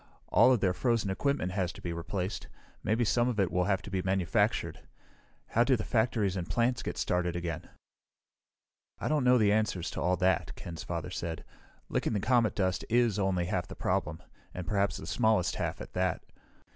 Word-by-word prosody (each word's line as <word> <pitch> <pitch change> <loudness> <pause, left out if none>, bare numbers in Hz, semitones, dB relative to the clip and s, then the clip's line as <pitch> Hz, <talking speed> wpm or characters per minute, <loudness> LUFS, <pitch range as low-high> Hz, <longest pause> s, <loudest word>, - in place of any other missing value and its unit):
All 130 - +6
of 120 -5 +2
their 95 -2 +2
frozen 115 -1 0
equipment 140 -3 0
has 90 -2 -1
to - - -12
be 85 - -4
replaced. 90 +3 -4 0.4
Maybe 115 +4 +1
some 120 +3 +2
of 115 -4 -2
it 95 -3 +2
will 90 0 +1
have 95 -2 0
to 100 - -9
be 95 -1 0
manufactured. 95 -2 0 0.7
How 120 - +3
do 130 +1 +3
the 110 - -3
factories 110 -5 +1
and 90 -2 -4
plants 120 +1 +1
get - - -5
started 90 -1 0
again?" 85 -3 -4 1.3
"I - - -2
don't 150 -3 +2
know 125 0 +5
the 105 -3 +4
answers 105 -5 0
to - - -4
all 90 +1 +2
that," 95 +2 +1
Ken's 85 -2 -7
father 85 0 -4
said. 85 -2 -4 0.4
"Licking - - -1
the 105 - +1
comet 115 0 +2
dust 95 -3 0
is 115 -3 +3
only 95 -3 +1
half 90 - -2
the - - -9
problem 80 +4 -1 0.3
and 90 - -5
perhaps 100 0 0
the - - -8
smallest 105 -5 +1
half, - - -2
at - - -9
that. - - 0
95 Hz, 195 wpm, -30 LUFS, 90-115 Hz, 1.3 s, All